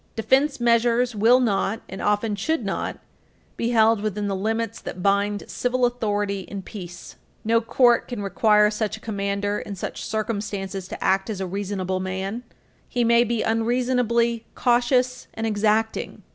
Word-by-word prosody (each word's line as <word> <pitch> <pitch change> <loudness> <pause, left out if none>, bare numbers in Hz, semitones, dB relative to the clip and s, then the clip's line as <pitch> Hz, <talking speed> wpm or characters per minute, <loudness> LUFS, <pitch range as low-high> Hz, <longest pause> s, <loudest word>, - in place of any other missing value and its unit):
Defense 270 +5 +2
measures 235 +1 +3
will 230 +5 +5
not, 220 -2 0
and 190 - -7
often 210 +1 +1
should 315 +11 -1
not, - - -3 0.6
be 235 - -1
held 225 -2 +4
within 210 -1 -2
the 195 - -1
limits 225 +3 -2
that 180 - -7
bind 200 +1 +1
civil 250 0 0
authority 205 -4 -1
in 195 +1 -7
peace. 175 -3 -9 0.3
No 230 +1 +3
court 240 +1 +3
can 235 -5 -5
require 210 +2 +3
such 215 0 -2
a - - -14
commander 205 -1 -2
in 200 - -6
such 185 - -5
circumstances 205 -3 -3
to - - -7
act 190 +2 +1
as 210 -3 -4
a 190 - -2
reasonable 190 -1 -3
man; 190 +4 -3 0.5
he 245 - 0
may 235 0 +5
be 235 -1 -1
unreasonably 235 0 +1
cautious 250 +1 +1
and 225 - -3
exacting. 220 +1 0
220 Hz, 155 wpm, -24 LUFS, 200-235 Hz, 0.6 s, will